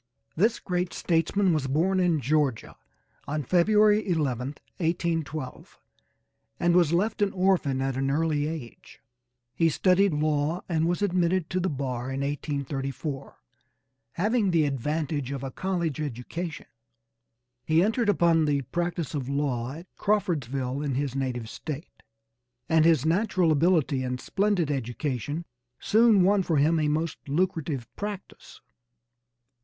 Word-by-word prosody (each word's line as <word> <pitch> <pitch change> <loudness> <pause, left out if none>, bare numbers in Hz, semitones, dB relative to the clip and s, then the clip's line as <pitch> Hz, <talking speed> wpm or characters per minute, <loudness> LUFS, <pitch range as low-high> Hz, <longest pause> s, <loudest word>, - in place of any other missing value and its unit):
This 220 +7 +2
great 180 -1 -2
statesman 175 +3 +1
was 150 -4 0
born 175 +8 +1
in 170 -5 +2
Georgia 140 -2 0 0.5
on 150 +1 -2
February 210 - +4
11, 135 -7 0 0.3
1812, 160 -5 -3 0.8
and 175 0 +3
was 170 -4 +4
left 205 +6 0
an 200 -1 +2
orphan 180 -9 +1
at 135 -1 -1
an 135 +1 0
early 150 0 +1
age. 155 -7 -8 0.5
He 165 -1 +3
studied 190 +4 +3
law 150 +2 0
and 165 -2 +1
was 175 +4 0
admitted 180 -2 +1
to 185 - 0
the 185 +1 0
bar 130 -4 -3
in 135 +1 -3
1834, 140 -1 -4 0.7
having 210 +2 +1
the 165 -4 +3
advantage 145 0 -2
of 140 -1 -4
a 135 - -4
college 170 -5 -2
education. 145 +3 -5 1.0
He 160 +2 +3
entered 220 +2 +1
upon 170 -4 +3
the 145 -2 +1
practice 170 +2 -3
of 135 -3 -3
law 135 -3 -1
at 165 +4 -9
Crawfordsville 140 - -1
in 140 -3 -2
his 135 -1 -2
native 125 -4 -2
State, 150 +6 -8 0.7
and 160 -1 +4
his 160 -4 +4
natural 180 0 +2
ability 155 -3 +2
and 125 0 -3
splendid 195 -5 0
education 135 +4 -3 0.3
soon 220 -3 +4
won 200 +2 +4
for 165 -4 0
him 160 +3 +3
a 150 - +1
most 155 +2 -1
lucrative 155 -6 -1
practice. 205 -2 -7
160 Hz, 135 wpm, -27 LUFS, 140-180 Hz, 1.0 s, February